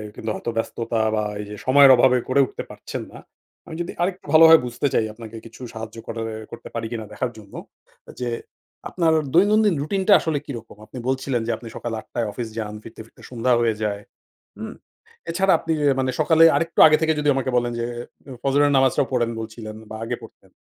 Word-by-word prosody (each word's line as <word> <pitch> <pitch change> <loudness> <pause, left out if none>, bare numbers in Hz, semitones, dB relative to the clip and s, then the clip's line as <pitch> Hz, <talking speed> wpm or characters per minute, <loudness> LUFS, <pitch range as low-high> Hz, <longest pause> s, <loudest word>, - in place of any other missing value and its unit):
কিন্তু 110 - -5
হয়তো 115 - -4
ব্যস্ততা 115 0 -2
বা 105 - 0 0.2
এইযে 105 0 -8
সময়ের 135 +1 +7
অভাবে 125 +1 +4
করে 135 +2 +3
উঠতে - - -7
পারছেন - - -7
না। - - -11 0.5
আমি 160 - -8
যদি 170 - -4
আরেকটু 180 +1 -2
ভালোভাবে 160 0 +9
বুঝতে 120 +4 -2
চাই, 110 - +2
আপনাকে 115 0 -11
কিছু 115 +3 -13
সাহায্য 110 0 -8
করার 115 0 -4
এ্যা 110 0 -8
করতে 115 - -9
পারি 115 -1 -3
কিনা 110 -2 -4
দেখার 120 +3 -2
জন্য। 100 -2 -15 0.7
যে 125 -1 -2 0.6
আপনার 165 -3 +1 0.2
দৈনন্দিন 205 +2 +4
রুটিনটা 190 +6 +2
আসলে 155 -4 -1
কিরকম? 115 -5 -9
আপনি 110 - -12
বলছিলেন 130 -2 -1
যে, - - +1
আপনি 115 +1 -11
সকাল 120 - -5
৮ঃ০০ - - -14
টায় 115 -2 -1
অফিস 115 +3 -5
যান, 105 -2 -4
ফিরতে 110 - -11
ফিরতে - - -21
সন্ধ্যা 125 0 +1
হয়ে 115 -2 +1
যায়। 100 -1 -2 0.6
হুম! - - -7 0.6
এছাড়া. 190 +3 +2
আপনি 165 - -2
অ্যা 140 -2 +3
মানে 130 0 0
সকালে 160 +1 +4
আরেকটু 165 0 -2
আগে 155 - +6
থেকে 160 0 +3
যদি 150 0 0
আমাকে 135 -1 -1
বলেন 120 0 +1
যে, 115 - -1 0.6
ফজরের 145 +1 +3
নামাজটা 135 -1 +3
পড়েন 120 -2 +1
বলছিলেন 110 -1 -8
বা 110 - -6
আগে - - -3
পড়তেন। - - -15
125 Hz, 195 wpm, -22 LUFS, 115-150 Hz, 0.7 s, ভালোভাবে